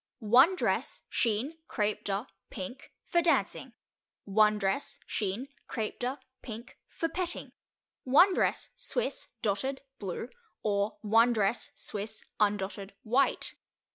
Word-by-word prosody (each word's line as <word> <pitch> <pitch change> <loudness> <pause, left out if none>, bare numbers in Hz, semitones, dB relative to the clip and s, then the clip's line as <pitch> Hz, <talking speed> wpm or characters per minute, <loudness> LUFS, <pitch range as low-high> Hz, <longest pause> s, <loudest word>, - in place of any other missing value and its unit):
1 255 - +6
Dress, - - 0
chine, 245 +8 0
crepe 210 -1 0
de, 200 +3 -1 0.2
pink, 210 +3 -7
for 345 - +3
dancing. 335 -1 +1 0.5
1 210 +1 +4
Dress, 195 +7 -1
chine, 210 +5 -2 0.2
crepe 220 -3 -3
de, 255 +3 -1 0.2
pink, 235 +1 -8
for 330 - -1
petting. 350 +1 -3 0.5
1 325 +9 +7
Dress, - - +1
Swiss, - - -1 0.2
Dotted, 265 +7 0 0.2
blue, 200 +4 -4 0.3
or 205 0 +1
1 230 +3 +5
Dress, 220 +1 +1
Swiss, 215 +1 -4
undotted, 200 -1 0
white. 250 +5 +2
220 Hz, 115 wpm, -31 LUFS, 205-265 Hz, 0.5 s, 1